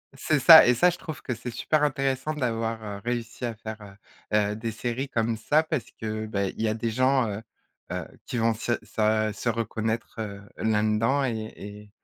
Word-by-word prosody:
c'est 150 +3 +1
ça 160 +3 +10
et 125 - +5
ça, 180 +9 +4
je 175 - -7
trouve 160 -5 -7
que 125 - -2
c'est 120 +1 -6
super 155 +5 0
intéressant 135 0 0
d'avoir, 115 -4 -1
heu, 100 -1 -6
réussi 120 0 -3
à 115 -1 -3
faire, 110 0 -8 0.5
heu 105 - +4
heu - - -3
des 115 +1 -4
séries 120 +4 -3
comme 115 -1 0
ça 150 +8 +2
parce 155 -5 -2
que, 110 0 -3
bah, 100 -2 -1
il - - -7
y 110 - +2
a 110 - 0
des 115 0 -2
gens, 130 +1 +2
heu 105 +1 -4 0.5
heu, - - -3 0.2
qui - - -3
vont 115 0 +2
se 115 +2 -2
se 110 0 +1
se 120 - -2
reconnaître, 110 0 -2
heu, 100 -2 -5 0.2
là-dedans 110 +5 +1
et 110 -3 -3
et 105 +1 -10
115 Hz, 205 wpm, -26 LUFS, 110-130 Hz, 0.5 s, ça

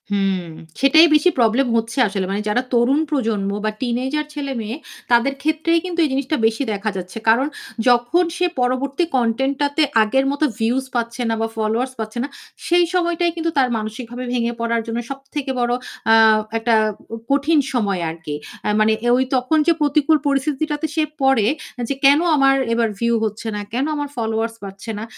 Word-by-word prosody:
হুম, 195 -2 +1 0.4
সেটাই 315 +5 +7
বেশি 300 +4 +4
প্রবলেম 240 +3 +3
হচ্ছে 225 +2 -3
আসলে। 195 -1 -2
মানে 200 +1 -1
যারা 240 +4 +2
তরুণ 245 +4 +3
প্রজন্ম 225 -9 -1 0.2
বা 215 - +1
টিনেজার 260 +5 -1
ছেলে-মেয়ে 260 -6 -4 0.4
তাদের 240 +3 +4
ক্ষেত্রেই 315 +2 +1
কিন্তু 355 -1 -4
এই - - -1
জিনিসটা 275 +3 -1
বেশি 225 +4 +1
দেখা 205 +2 -2
যাচ্ছে। 185 +3 -7
কারণ 245 +5 +4 0.4
যখন 245 +8 +3
সে 360 - +2
পরবর্তী 255 +5 0
কনটেন্টটাতে 270 +5 0 0.2
আগের 265 +5 +1
মত 285 - -5 0.2
ভিউজ 245 +4 0
পাচ্ছে 235 +1 -2
না 225 - +1
বা 225 - +1
ফলোয়ার্স 225 +4 -1
পাচ্ছে 220 +1 -5
না, - - -3 0.4
সেই 350 0 +4
সময়টাই 345 -1 +1
কিন্তু 330 0 -1
তার 265 -2 +4
মানসিকভাবে 230 +3 -6
ভেঙে 235 -1 0
পড়ার 235 0 0
জন্য 230 +1 -2
সবথেকে 275 0 -5
বড় 240 0 +1 0.4
আ - - +7 0.4
একটা 225 +1 +1 0.4
উ - - -2 0.2
কঠিন 290 +3 +3
সময় 200 -7 0
আরকি। 160 -2 -6 0.3
আ - - +2
মানে 215 0 +4 0.2
ঐ - - +6 0.2
তখন 255 +5 +1
যে 335 - +6
প্রতিকূল 300 +1 +3
পরিস্থিতিটাতে 295 +2 -1
সে 315 - +2 0.2
পড়ে 265 -6 +3 0.4
যে, - - +1
"কেনো 285 +4 +6
আমার 270 -1 +4 0.2
এবার 230 0 +2
ভিউ 235 0 +1
হচ্ছে 215 +1 -5
না। 210 - -3
কেনো 260 +5 -1
আমার 290 -1 -3
ফলোয়ার্স 225 -1 -2
বাড়ছে 195 +3 -7
না।" 210 - -5
250 Hz, 170 wpm, -20 LUFS, 225-285 Hz, 0.4 s, সেটাই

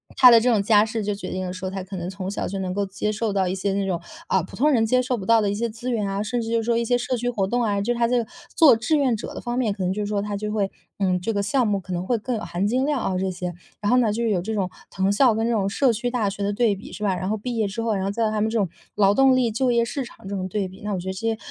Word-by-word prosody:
他 250 - +9
的 230 - +8
这 250 +2 +2
种 210 -3 +3
家 210 0 +4
世 220 -1 -3
就 205 0 -1
决 205 - -7
定 185 0 -3
了 - - -4
说， 185 0 -4
他 190 -1 -4
可 190 +1 -8
能 175 0 -4
从 190 0 -5
小 - - -3
就 195 +1 -4
能 185 -1 -2
够 200 0 0
接 200 +2 -2
受 215 -1 -2
到 190 -2 +1
一 185 - -1
些 195 +1 -1
那 200 0 0
种， 175 -3 -1 0.3
啊， 190 - +2
普 - - -10
通 295 +5 +3
人 225 -4 +3
接 255 +3 +3
受 250 -1 -1
不 190 - -6
到 230 0 +5
的 205 - +1
一 - - -2
些 230 +2 -1
资 235 +3 -6
源 210 -4 0
啊， 195 +1 -2
甚 235 +3 -2
至 225 - -4
就 230 -1 +2
说 235 0 +1
一 235 - 0
些 245 +1 +2
社 250 +1 -2
区 245 +1 -1
活 200 -5 0
动 245 +3 0
啊， 200 -2 0
就 240 +4 0
他 235 0 +2
这 245 +1 +2
个 - - -14 0.3
做 300 -8 +7
志 245 +7 +1
愿 260 -5 +2
者 - - -7
的 - - -6
方 240 0 -3
面， 220 -5 +1
可 195 - -4
能 180 - 0
就 210 - -3
是 - - -3
说 205 -1 -1
他 205 -1 -3
就 210 +1 -3
会 200 -2 0 0.3
嗯， 185 -2 +1
这 225 - -1
个 200 0 0
项 240 +3 +1
目 200 -1 +1
可 185 0 -7
能 175 +1 -2
会 240 - +2
更 240 +3 -3
有 215 - -4
含 185 0 -2
金 255 +4 +1
量 290 -4 +1
啊 185 - -1
这 190 0 0
些。 180 -1 -4 0.3
然 205 - +1
后 250 - +5
呢， 230 -4 +3
就 235 +3 -2
是 230 - +1
有 180 -3 +1
这 220 +4 -4
种 190 -3 -1 0.2
藤 190 +1 0
校 225 +1 +4
跟 225 +1 0
这 235 - +1
种 200 -3 +1
社 250 +2 +2
区 245 +2 -2
大 235 -5 0
学 200 - -7
的 200 - 0
对 220 -2 +2
比 195 - -11
是 210 - -7
吧， 195 -3 +1
然 185 +2 -3
后 215 - 0
毕 240 +3 -4
业 220 -3 +1
之 210 +4 -4
后， 225 -2 +1
然 190 - -1
后 195 - -1
在 220 0 0
他 215 -1 -1
们 220 - +1
这 230 - -1
种 200 -4 +2 0.3
劳 200 -1 +4
动 265 +3 +5
力 245 -3 +2
就 245 +3 +1
业 235 0 +3
市 270 +3 -3
场 225 -3 -13
这 200 - -4
种 185 -1 -3
对 195 0 -2
比， 190 +1 -14
那 210 -1 -2
我 - - -3
觉 180 - -7
得 - - -2
这 190 - -7
些 225 -1 -1
210 Hz, 385 characters per minute, -23 LUFS, 195-235 Hz, 0.3 s, 他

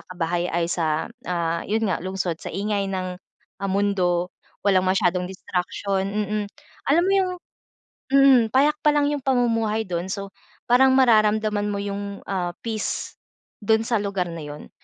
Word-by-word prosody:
kabahay 175 0 -1
ay, 170 0 +1
sa, 160 -3 0 0.2
ah, 170 -2 -1
'yon 220 +2 +1
nga, 185 - 0
lungsod, 185 -2 -3
sa - - -6
ingay 200 +1 -1
ng, 185 -1 -3 0.5
ah, 195 - -1
mundo, 185 -3 +1 0.3
walang 190 -2 +3
masyadong 180 -1 +1
distraction, 190 +1 -2
mm, 210 +1 -1 0.5
alam 330 +5 +5
mo 390 - +2
yung 380 -2 +2 0.8
mm, 275 -3 +7
payak 290 +3 +4
pa 300 - +5
lang 295 -1 +3
yung 290 - -2
pamumuhay 230 -4 +1
do'n, 175 0 -3
so, 200 -1 -5 0.4
parang 260 +2 +6
mararamdaman 215 -4 +3
mo 205 - -2
yung, 200 0 -5
ah, 180 -3 -1
peace 220 -2 -3 0.5
do'n 220 +2 +3
sa 230 -2 +1
lugar 195 -3 -2
na 165 - -6
'yon. 150 0 -9
200 Hz, 155 wpm, -23 LUFS, 180-220 Hz, 0.8 s, mm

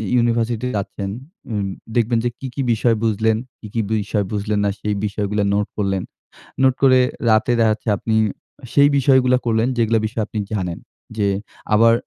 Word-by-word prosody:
ইউনিভার্সিটিতে 120 0 +1
যাচ্ছেন 100 0 -4 0.4
উম 100 -2 -1 0.3
দেখবেন 120 0 +2
যে - - +2
কি, 135 - -5
কি 140 - -1
বিষয় 115 +1 +2
বুঝলেন? 110 0 +2 0.2
কি, 110 - -9
কি 115 - +1 0.2
বিষয় 105 0 -1
বুঝলেন 105 0 -1
না - - +2
সেই 105 0 -1
বিষয়গুলা 105 0 -1
নোট 105 0 +1
করলেন। 95 -2 0 0.6
নোট 130 -1 +5
করে 130 -2 +6 0.3
রাতে 110 +2 +3
দেখাচ্ছে 110 0 +1
আপনি 110 +2 -1 0.6
সেই 145 0 +6
বিষয়গুলা 130 -2 +4
করলেন 115 0 +2
যেগুলা 115 -1 +2
বিষয়ে 110 0 -2
আপনি 110 - -4
জানেন। 90 -5 -2 0.4
যে 105 -2 +2 0.5
আবার 115 +2 +6
110 Hz, 160 wpm, -20 LUFS, 105-120 Hz, 0.6 s, করে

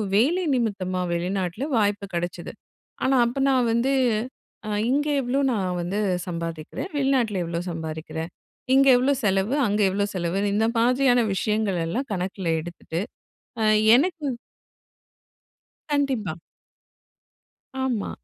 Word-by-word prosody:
வேலை 325 - +3
நிமித்தமா 190 -6 -1
வெளிநாட்டில 180 +5 -2
வாய்ப்பு 205 -1 +1
கிடைச்சது. 175 0 -4 0.5
ஆனா 265 0 +3
அப்ப 270 +3 -2
நான் 255 -3 +3
வந்து 255 +4 +2 0.7
அ - - -3 0.2
இங்கே 295 +2 +1
எவ்வளோ 255 +3 0
நான் 185 -4 -1
வந்து 190 +4 -2 0.3
சம்பாதிக்கிறேன், 165 - -5
வெளிநாட்டில 255 -9 +1
எவ்வளோ 170 0 -3
சம்பாறிக்கிறேன். 160 0 -5 0.5
இங்கே 275 0 +6
எவ்வளோ 265 +3 +2
செலவு, 195 +4 +1
அங்கே 205 0 +1
எவ்வளோ 200 +2 0
செலவுன்னு 195 +4 -1
இந்த 220 +1 +2
மாதிரியான 250 0 +3
விஷயங்கள் 210 -3 0
எல்லாம் 250 +9 -3
கணக்கில் 185 -1 -2
எடுத்துட்டு 170 +1 -5 0.6
அ 220 - +2 0.3
எனக்கு 320 +2 +1 1.7
கண்டிப்பா. 255 - 0 1.5
ஆமா. 235 -6 -1
205 Hz, 110 wpm, -24 LUFS, 180-255 Hz, 1.7 s, இங்கே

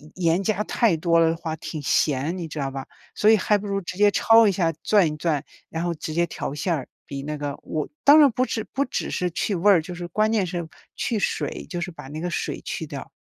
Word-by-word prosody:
盐 170 0 +2
加 210 0 0
太 220 -5 +2
多 170 +1 +3
了 165 -1 +4
的 165 - -2
话， 165 -2 -4
挺 155 -1 -6
咸， 145 +4 +1
你 170 -2 -5
知 155 0 -6
道 135 - -1
吧？ 135 -1 -6 0.3
所 210 - +4
以 225 - +7
还 210 +2 +2
不 205 - -7
如 195 0 -1
直 185 +1 -7
接 205 0 +5
焯 225 +1 +6
一 - - +4
下、 175 -3 +1
攥 205 -6 +4
一 - - -8
攥， 150 -3 0 0.3
然 165 +1 -3
后 175 - -1
直 155 - -6
接 170 +2 +2
调 - - -5
馅 170 +3 -1
儿， 135 - -5 0.2
比 140 0 -6
那 150 +1 -4
个 145 -1 -4
我 155 -1 -3
当 290 +2 +8
然 285 -3 +7
不 255 +3 +1
只 220 - -3
不 280 +1 +1
只 - - -3
是 180 -1 -1
去 195 +4 -1
味 200 +4 +4
儿， 175 - +5
就 180 +2 -8
是 175 0 -6
关 215 +4 +1
键 210 -4 +2
是 170 -2 -4 0.3
去 230 - -1
水， - - -2
就 175 -2 -4
是 175 - -3
把 145 -5 -11
那 155 +2 -6
个 180 - -2
水 170 - -3
去 - - -4
掉。 - - -8
175 Hz, 280 characters per minute, -24 LUFS, 155-205 Hz, 0.3 s, 当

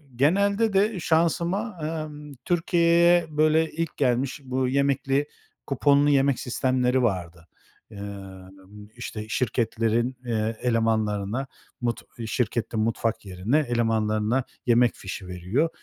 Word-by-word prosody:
genelde 200 - +2
de 200 +1 +2
şansıma, 170 +6 0
emm, 150 -2 -5
Türkiye'ye 170 0 +4
böyle 155 +1 +3
ilk 165 0 -4
gelmiş 130 +2 0
bu 130 0 -1
yemekli, 140 +1 +1 0.4
kuponlu 145 +1 +3
yemek 140 -2 +3
sistemleri 130 0 +1
vardı. 85 -6 -2 0.4
Emm, 100 0 -10
işte, 110 -3 -6
şirketlerin, 115 0 0
eee, 110 -1 -1
elemanlarına, 110 0 0 0.3
mut 120 0 -1 0.2
şirketin 115 0 -1
mutfak 115 0 -1
yerine 95 +9 0
elemanlarına 115 -2 0 0.2
yemek 120 -1 +4
fişi 95 -1 -7
veriyor. 90 - -1
125 Hz, 100 wpm, -25 LUFS, 110-150 Hz, 0.4 s, Türkiye'ye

